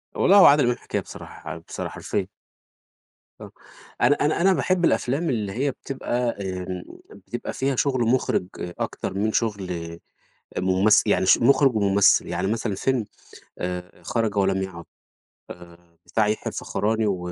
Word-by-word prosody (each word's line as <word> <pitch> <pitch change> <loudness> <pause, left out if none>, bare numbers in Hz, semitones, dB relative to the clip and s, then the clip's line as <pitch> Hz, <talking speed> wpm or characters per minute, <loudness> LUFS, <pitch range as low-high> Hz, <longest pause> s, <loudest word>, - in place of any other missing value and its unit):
والله 200 +2 +5
هو 195 - +9
عادل 145 0 +7
إمام 120 0 +1
حكاية - - -3
بصراحة 80 +2 -9
بصراحة، 80 - -7
حرفيًا. - - -3 1.1
آه، - - -10 0.5
أنا 145 - +5
أنا 150 +3 0
أنا 190 +1 +5
باحب 180 -1 +1
الأفلام 145 +7 0
اللي 105 -6 -2
هي 135 +6 -1
بتبقى 125 -2 -3
آمم، 90 -1 -5 0.3
بتبقى - - -7
فيها 135 0 -1
شغل 130 0 0
مخرج 120 -5 +1
أكتر 90 +1 -4
من 105 +3 0
شغل 100 -5 -1 0.9
آآ، - - 0
ممثل. 95 +3 +3
يعني 95 +1 +2
شغل 115 - +5
مخرج 135 -3 +4
وممثل، 100 -1 +4
يعني - - -2
مثلًا 115 -2 -2
فيلم 125 +4 0 0.6
آآ، 90 0 -6
خرج 115 -3 -1
ولم 95 -1 +2
يعد 90 -3 -7 1.0
آآ، 85 -1 -33
بتاع 110 -2 +1
يحيى 105 - -2
الفخراني 110 +1 -1
و 100 -2 0
110 Hz, 150 wpm, -24 LUFS, 95-130 Hz, 1.1 s, هو